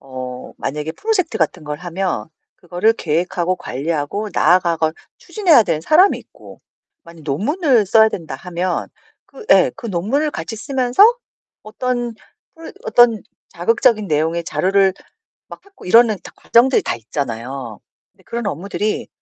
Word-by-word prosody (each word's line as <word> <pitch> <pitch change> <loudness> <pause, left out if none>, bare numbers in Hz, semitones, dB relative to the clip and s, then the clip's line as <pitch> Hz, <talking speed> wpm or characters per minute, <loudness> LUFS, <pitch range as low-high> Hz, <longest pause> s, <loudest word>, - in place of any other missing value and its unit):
어 130 -1 -8
만약에 150 +2 -4
프로젝트 410 - -1
같은 165 -4 -1
걸 150 0 -5
하면 180 -1 -3 0.3
그거를 180 +5 +1
계획하고 180 +1 -1
관리하고 155 +10 -3
나아가고 170 -3 +2 0.3
추진해야 345 - +3
되는 155 - -1
사람이 330 - +4
있고 - - -16 0.4
만약에 170 -1 -14
논문을 235 - +1
써야 220 +3 +5
된다 165 -7 -6
하면 180 0 -3 0.4
그 470 - -13
예 - - +6
그 275 - -8
논문을 225 - -1
같이 225 -5 -6
쓰면서 255 - +1 0.6
어떤 240 +2 -3 0.4
프로 325 0 -11
어떤 240 - +4 0.3
자극적인 230 - +1
내용의 160 +2 0
자료를 190 +2 +2 0.5
막 - - -11
찾고 400 -1 -16
이러는 225 +2 +5
다 - - -12
과정들이 250 +3 +3
다 - - -2
있잖아요. 120 -1 -5 0.3
근데 190 - -27
그런 235 -2 -4
업무들이 200 +4 -3
190 Hz, 320 characters per minute, -18 LUFS, 160-240 Hz, 0.6 s, 예